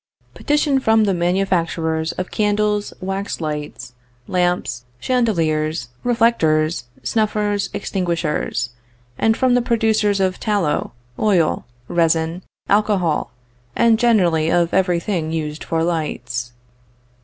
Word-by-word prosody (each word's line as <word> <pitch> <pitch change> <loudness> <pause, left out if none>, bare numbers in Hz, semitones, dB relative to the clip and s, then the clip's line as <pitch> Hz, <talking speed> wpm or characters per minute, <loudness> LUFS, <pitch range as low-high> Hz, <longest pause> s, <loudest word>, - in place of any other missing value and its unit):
PETITION 295 -2 +1
FROM 220 -3 +3
THE 200 -2 +2
MANUFACTURERS 170 -3 0
OF 185 - -5
CANDLES, 210 0 0
WAX 195 +2 -3
LIGHTS, 150 -5 -5 0.3
LAMPS, 175 -9 0 0.2
CHANDELIERS, 160 - 0
REFLECTORS, 165 - +2 0.2
SNUFFERS, 210 -2 0
EXTINGUISHERS; 165 - -2 0.5
AND 220 0 +3
FROM 255 -1 +3
THE 245 - +4
PRODUCERS 220 -4 +1
OF 185 -1 0
TALLOW, 200 - 0 0.3
OIL, 185 -7 +2 0.2
RESIN, 165 0 +1 0.3
ALCOHOL, 200 -6 +1 0.5
AND 230 -1 +4
GENERALLY 180 -10 +3
OF 170 -1 +2
EVERY 180 -2 +2
THING 170 -4 -2
USED 155 -1 -3
FOR 165 0 -1
LIGHTS. 150 -7 -3
180 Hz, 105 wpm, -20 LUFS, 160-210 Hz, 0.5 s, THE